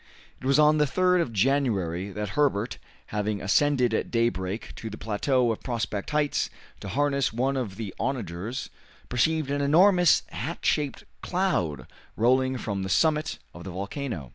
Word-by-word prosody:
It 130 - -5
was 140 - +4
on 150 0 +5
the 150 - +4
3rd 180 +4 +2
of 135 - -2
January 100 -7 +1
that 105 +1 -4
Herbert, 115 -2 0 0.3
having 105 0 -1
ascended 125 +4 +2
at - - -1
daybreak 110 -4 -1
to 110 - -6
the 105 - -8
plateau 120 +3 +1
of 110 - -4
Prospect 110 -5 -3
Heights 150 -1 +1 0.3
to - - -8
harness 140 +5 +1
one 130 +5 0
of 120 -8 -3
the 105 -3 -5
onagers, 115 -1 -3 0.4
perceived 145 +4 +1
an 145 0 0
enormous 175 +4 +5
hat - - -5
shaped 145 -3 0 0.2
cloud 90 - -1 0.3
rolling 130 +3 +3
from 100 -4 -3
the 95 - -3
summit 155 - +2 0.2
of 85 - -10
the 95 - -7
volcano. 100 - -5
125 Hz, 160 wpm, -26 LUFS, 100-145 Hz, 0.4 s, on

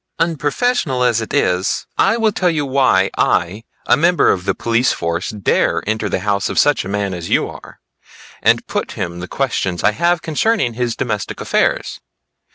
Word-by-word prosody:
Unprofessional 160 - 0
as 120 -2 +2
it 110 - -6
is, 90 -9 0
I 225 - +2
will 225 -2 +2
tell 185 -3 +1
you 150 -3 -1
why 130 -8 +2
I, 95 +6 +1 0.2
a - - +4
member 170 +3 +3
of 90 -1 -2
the 100 - 0
police 115 +2 +1
force, 85 +2 -2
dare 105 -3 0
enter 110 0 -1
the 90 - -2
house 100 0 0
of - - -5
such 145 0 +3
a - - -7
man 100 -1 -2
as 85 -1 -6
you - - +2
are, - - -12 0.6
and - - +3
put - - -3
him 85 0 -5
the 90 - -6
questions 95 -8 -2
I 105 - +4
have 170 +7 0
concerning 160 - 0
his 120 0 -2
domestic - - -3
affairs. - - 0
115 Hz, 180 wpm, -18 LUFS, 95-150 Hz, 0.6 s, a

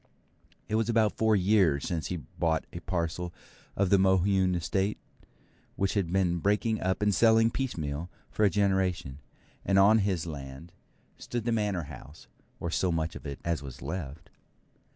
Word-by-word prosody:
It - - -6
was 110 +1 +1
about 110 -3 +2
four 110 -1 +3
years 95 -7 +3
since 80 -3 -2
he 90 - -3
bought 80 +2 -2
a 85 - -5
parcel 85 0 -3 0.4
of 100 -2 +1
the 100 - +6
Mohune 95 0 +3
Estate, 95 +4 -1 0.8
which 100 0 0
had 95 -5 -1
been 90 -2 +1
breaking 105 +4 +1
up 95 +2 0
and 105 -1 +3
selling 115 +1 +4
piecemeal 85 - -3 0.2
for 110 - 0
a 105 - +6
generation; 95 -8 0 0.4
and 95 - +2
on 105 +3 +6
his 95 -5 0
land 70 +1 -8 0.5
stood 120 -2 -4
the 120 - +1
Manor 105 -6 0
House, 70 +1 -12 0.3
or 85 - -3
so 90 +1 +1
much 80 0 -2
of - - -8
it 70 - -6
as 85 -3 -1
was 65 -3 -9
left. 80 +1 -6
90 Hz, 165 wpm, -29 LUFS, 80-105 Hz, 0.8 s, the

